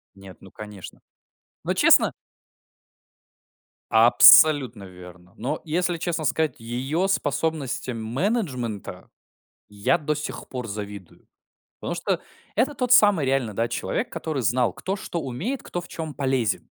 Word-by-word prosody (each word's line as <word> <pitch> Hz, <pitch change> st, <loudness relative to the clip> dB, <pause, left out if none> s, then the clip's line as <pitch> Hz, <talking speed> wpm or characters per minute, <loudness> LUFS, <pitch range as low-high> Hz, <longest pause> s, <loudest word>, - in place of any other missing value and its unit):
Нет, 95 Hz, -1 st, -13 dB
ну, 95 Hz, -, -15 dB
конечно. 105 Hz, -3 st, -11 dB, 0.6 s
Ну, -, -, -1 dB
честно? -, -, +5 dB, 1.8 s
Абсолютно 120 Hz, +1 st, +6 dB
верно. 90 Hz, -1 st, -14 dB
Но 145 Hz, +5 st, -3 dB
если 175 Hz, +2 st, -1 dB
честно 165 Hz, -2 st, -3 dB
сказать, 155 Hz, +4 st, 0 dB
её 135 Hz, +11 st, -2 dB
способностям 140 Hz, -, -2 dB
менеджмента 130 Hz, -, -3 dB, 0.6 s
я 105 Hz, +11 st, 0 dB
до 150 Hz, 0 st, -2 dB
сих 150 Hz, -, -6 dB
пор 125 Hz, -3 st, -6 dB
завидую. 100 Hz, -2 st, -8 dB, 0.5 s
Потому -, -, -4 dB
что -, -, -2 dB, 0.3 s
это 290 Hz, +3 st, +1 dB
тот 250 Hz, -1 st, -2 dB
самый 205 Hz, -, +5 dB
реально, 130 Hz, -5 st, 0 dB
да, 115 Hz, +3 st, -1 dB
человек, -, -, -3 dB
который 155 Hz, -5 st, -4 dB
знал, 120 Hz, +3 st, +1 dB
кто 195 Hz, +2 st, -4 dB
что 170 Hz, -3 st, -5 dB
умеет, 165 Hz, -, -4 dB
кто 175 Hz, -, -5 dB
в 175 Hz, -, -10 dB
чём 160 Hz, -3 st, -6 dB
полезен. 130 Hz, -7 st, 0 dB
130 Hz, 130 wpm, -24 LUFS, 110-160 Hz, 1.8 s, Абсолютно